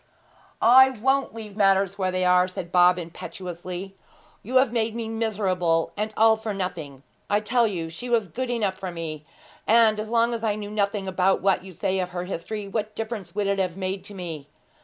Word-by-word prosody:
'I 260 Hz, +3 st, +8 dB
won't 270 Hz, +1 st, +1 dB
leave 215 Hz, -3 st, -8 dB
matters 195 Hz, -2 st, +3 dB
where 185 Hz, -1 st, +1 dB
they 185 Hz, 0 st, 0 dB
are,' 180 Hz, 0 st, +4 dB
said 180 Hz, -2 st, -7 dB
Bob 180 Hz, 0 st, +5 dB
impetuously. 180 Hz, +2 st, -7 dB, 0.5 s
'You 250 Hz, +6 st, -6 dB
have 260 Hz, -2 st, +5 dB
made 225 Hz, -1 st, 0 dB
me 230 Hz, -1 st, -3 dB
miserable, 195 Hz, -7 st, 0 dB
and 215 Hz, +1 st, -2 dB
all 220 Hz, 0 st, +6 dB
for 220 Hz, -2 st, -4 dB
nothing. 160 Hz, -8 st, -5 dB, 0.3 s
I 205 Hz, -, +3 dB
tell 235 Hz, +2 st, +2 dB
you 175 Hz, -6 st, -3 dB
she 205 Hz, +10 st, -7 dB
was 230 Hz, -4 st, +2 dB
good 255 Hz, +8 st, -4 dB
enough 220 Hz, -6 st, 0 dB
for 190 Hz, -, -4 dB
me; 160 Hz, -3 st, -6 dB, 0.4 s
and 220 Hz, -1 st, +5 dB
as 215 Hz, 0 st, -4 dB
long 235 Hz, +1 st, +2 dB
as 230 Hz, -1 st, -4 dB
I 215 Hz, -2 st, +1 dB
knew 205 Hz, -1 st, -6 dB
nothing 200 Hz, -1 st, -1 dB
about 190 Hz, 0 st, +1 dB
what 190 Hz, -2 st, +2 dB
you 190 Hz, -, -10 dB
say 190 Hz, +2 st, -1 dB
of 180 Hz, -1 st, -2 dB
her 180 Hz, 0 st, -4 dB
history, 195 Hz, +3 st, -5 dB
what 215 Hz, +1 st, -3 dB
difference 220 Hz, -4 st, -5 dB
would 205 Hz, -1 st, 0 dB
it 200 Hz, 0 st, 0 dB
have 185 Hz, -2 st, -1 dB
made 190 Hz, 0 st, -3 dB
to 205 Hz, -, -9 dB
me? 165 Hz, -6 st, -6 dB
195 Hz, 200 wpm, -25 LUFS, 180-220 Hz, 0.5 s, I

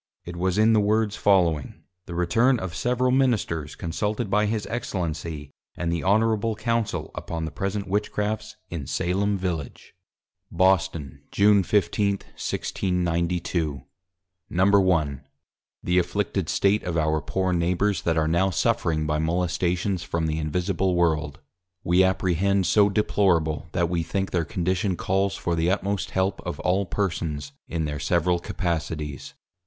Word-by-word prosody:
It 85 Hz, -, -7 dB
was 90 Hz, +2 st, 0 dB
in 110 Hz, +1 st, +5 dB
the 110 Hz, -, +5 dB
Words 105 Hz, 0 st, +1 dB
following: 85 Hz, -8 st, +1 dB, 0.2 s
The 85 Hz, -, -6 dB
Return 115 Hz, +10 st, +3 dB
of 90 Hz, -3 st, -5 dB
several 125 Hz, +6 st, +1 dB
Ministers 110 Hz, -, +1 dB
consulted 105 Hz, +5 st, -2 dB
by 105 Hz, 0 st, +3 dB
his 110 Hz, -1 st, -1 dB
Excellency, 85 Hz, -9 st, -4 dB, 0.3 s
and 85 Hz, -1 st, -1 dB
the 85 Hz, -, -2 dB
Honourable 110 Hz, +2 st, +2 dB
Council, 115 Hz, 0 st, -1 dB
upon 80 Hz, -1 st, -4 dB
the 80 Hz, -, -5 dB
present 100 Hz, +1 st, -3 dB
Witchcrafts 105 Hz, +2 st, -2 dB, 0.2 s
in 75 Hz, -6 st, -5 dB
Salem 100 Hz, +3 st, 0 dB
Village. 85 Hz, -7 st, -5 dB, 0.6 s
Boston, 90 Hz, -5 st, +1 dB
June 100 Hz, 0 st, +4 dB
15, 100 Hz, +1 st, +1 dB, 0.2 s
1692. 85 Hz, -5 st, -1 dB, 0.7 s
I. -, -, -12 dB
_The 90 Hz, -2 st, 0 dB
afflicted 90 Hz, -1 st, -1 dB
State 100 Hz, +2 st, +2 dB
of 85 Hz, -2 st, -3 dB
our 80 Hz, -1 st, +1 dB
poor 95 Hz, +4 st, -1 dB
Neighbours, 90 Hz, +4 st, +1 dB
that 80 Hz, -1 st, 0 dB
are 80 Hz, -1 st, +2 dB
now 85 Hz, +4 st, +2 dB
suffering 80 Hz, -3 st, 0 dB
by 75 Hz, 0 st, 0 dB
Molestations 90 Hz, +3 st, 0 dB
from 85 Hz, -1 st, -2 dB
the 80 Hz, 0 st, -1 dB
Invisible 90 Hz, +4 st, 0 dB
World, 80 Hz, -4 st, 0 dB, 0.4 s
we 90 Hz, +2 st, +4 dB
apprehend 95 Hz, +1 st, +1 dB
so 100 Hz, +3 st, +4 dB
deplorable, 85 Hz, -7 st, +1 dB
that 85 Hz, -, +1 dB
we 85 Hz, 0 st, -1 dB
think 95 Hz, +4 st, -2 dB
their 85 Hz, -3 st, 0 dB
Condition 90 Hz, +1 st, -1 dB
calls 95 Hz, +2 st, 0 dB
for 85 Hz, -, -2 dB
the 85 Hz, +1 st, +1 dB
utmost 100 Hz, -1 st, -1 dB
help 95 Hz, +1 st, -1 dB
of -, -, -5 dB
all 95 Hz, +2 st, +1 dB
Persons 80 Hz, -8 st, -2 dB, 0.2 s
in 80 Hz, -2 st, -2 dB
their 75 Hz, -1 st, -3 dB
several 85 Hz, +2 st, +1 dB
Capacities. 75 Hz, -5 st, -4 dB
90 Hz, 140 wpm, -25 LUFS, 80-100 Hz, 0.7 s, in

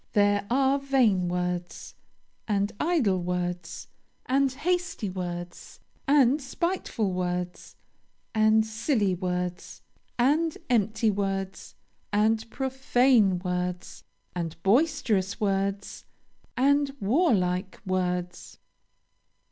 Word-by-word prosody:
There 205 Hz, 0 st, +2 dB
are 270 Hz, +2 st, +2 dB
vain 245 Hz, -10 st, +2 dB
words, 180 Hz, 0 st, -3 dB, 0.5 s
and 205 Hz, -1 st, 0 dB
idle 255 Hz, -, +1 dB
words, 180 Hz, -1 st, -4 dB, 0.4 s
and 270 Hz, +1 st, +2 dB
hasty 325 Hz, -, -2 dB
words, 175 Hz, -1 st, -6 dB, 0.3 s
and 280 Hz, 0 st, +4 dB
spiteful 270 Hz, -, -2 dB
words, 180 Hz, 0 st, -3 dB, 0.6 s
and 220 Hz, 0 st, +4 dB
silly 220 Hz, -2 st, 0 dB
words, 180 Hz, 0 st, -4 dB, 0.3 s
and 300 Hz, +6 st, +2 dB
empty 220 Hz, -1 st, +2 dB
words, 195 Hz, -1 st, -3 dB, 0.4 s
and 220 Hz, +2 st, +1 dB
profane 255 Hz, -6 st, +2 dB
words, 180 Hz, 0 st, -3 dB, 0.3 s
and 165 Hz, -2 st, -3 dB
boisterous 220 Hz, -, +1 dB
words, 195 Hz, -1 st, -2 dB, 0.5 s
and 280 Hz, +1 st, +2 dB
warlike 195 Hz, -, +1 dB
words. 180 Hz, -1 st, -2 dB
205 Hz, 85 wpm, -27 LUFS, 180-265 Hz, 0.6 s, and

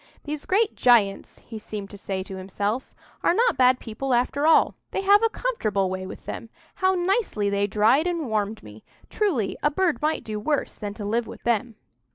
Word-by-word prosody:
"These 300 Hz, 0 st, -5 dB
great 425 Hz, +3 st, +2 dB
giants," 225 Hz, -6 st, +2 dB
he 225 Hz, -2 st, -8 dB
seemed 205 Hz, -2 st, -7 dB
to -, -, -9 dB
say 190 Hz, -1 st, -4 dB
to 190 Hz, -, -8 dB
himself, 200 Hz, +6 st, -3 dB, 0.3 s
"are 345 Hz, -, +3 dB
not 480 Hz, +3 st, +3 dB
bad 255 Hz, 0 st, +4 dB
people 245 Hz, +3 st, -2 dB
after 280 Hz, +5 st, +1 dB
all; 325 Hz, -, +5 dB, 0.2 s
they -, -, -2 dB
have 405 Hz, +2 st, +6 dB
a 455 Hz, -, +3 dB
comfortable 215 Hz, -, -1 dB
way 185 Hz, 0 st, -4 dB
with -, -, -10 dB
them; 230 Hz, -, -6 dB, 0.2 s
how 375 Hz, 0 st, +1 dB
nicely 355 Hz, -, 0 dB
they 200 Hz, 0 st, +1 dB
dried 220 Hz, -, +3 dB
and 340 Hz, -3 st, -1 dB
warmed 215 Hz, -1 st, -2 dB
me! 105 Hz, 0 st, -13 dB, 0.3 s
Truly 310 Hz, -, 0 dB
a 295 Hz, -, +3 dB
bird 340 Hz, +1 st, 0 dB
might 310 Hz, +1 st, 0 dB
do 215 Hz, -1 st, -4 dB
worse 290 Hz, +7 st, -1 dB
than 205 Hz, -1 st, -6 dB
to 210 Hz, -2 st, -6 dB
live 230 Hz, +3 st, 0 dB
with -, -, -11 dB
them." 235 Hz, 0 st, 0 dB
235 Hz, 200 wpm, -24 LUFS, 205-325 Hz, 0.3 s, have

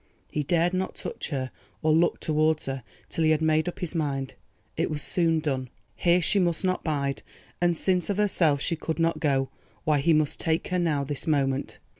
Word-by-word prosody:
He 150 Hz, -, -1 dB
dared 170 Hz, +4 st, +1 dB
not 185 Hz, 0 st, -2 dB
touch -, -, -5 dB
her 130 Hz, -4 st, -3 dB, 0.3 s
or 155 Hz, 0 st, +4 dB
look 170 Hz, +2 st, +3 dB
towards 155 Hz, 0 st, +1 dB
her—till 135 Hz, -, -5 dB
he 155 Hz, -, +4 dB
had 155 Hz, -1 st, +4 dB
made 155 Hz, +1 st, +2 dB
up -, -, -9 dB
his 175 Hz, -2 st, -3 dB
mind. 140 Hz, -5 st, -2 dB, 0.4 s
It -, -, 0 dB
was 150 Hz, -1 st, -3 dB
soon 165 Hz, -2 st, +2 dB
done. 130 Hz, -4 st, -2 dB, 0.3 s
Here 175 Hz, 0 st, +3 dB
she 200 Hz, -, +4 dB
must 175 Hz, -1 st, +1 dB
not 185 Hz, 0 st, 0 dB
bide, 140 Hz, -3 st, -1 dB, 0.4 s
and 175 Hz, -1 st, +3 dB
since 180 Hz, 0 st, +1 dB
of 200 Hz, -, 0 dB
herself 165 Hz, -9 st, +2 dB
she 170 Hz, -, 0 dB
could 160 Hz, 0 st, -3 dB
not 165 Hz, 0 st, +1 dB
go, 135 Hz, -3 st, +1 dB, 0.3 s
why 150 Hz, -3 st, +2 dB
he 165 Hz, +4 st, +3 dB
must 155 Hz, -2 st, +1 dB
take 160 Hz, 0 st, 0 dB
her 180 Hz, -, +1 dB
now, 155 Hz, -5 st, +1 dB
this 140 Hz, +2 st, -4 dB
moment! 140 Hz, -3 st, 0 dB
155 Hz, 200 wpm, -27 LUFS, 140-170 Hz, 0.4 s, or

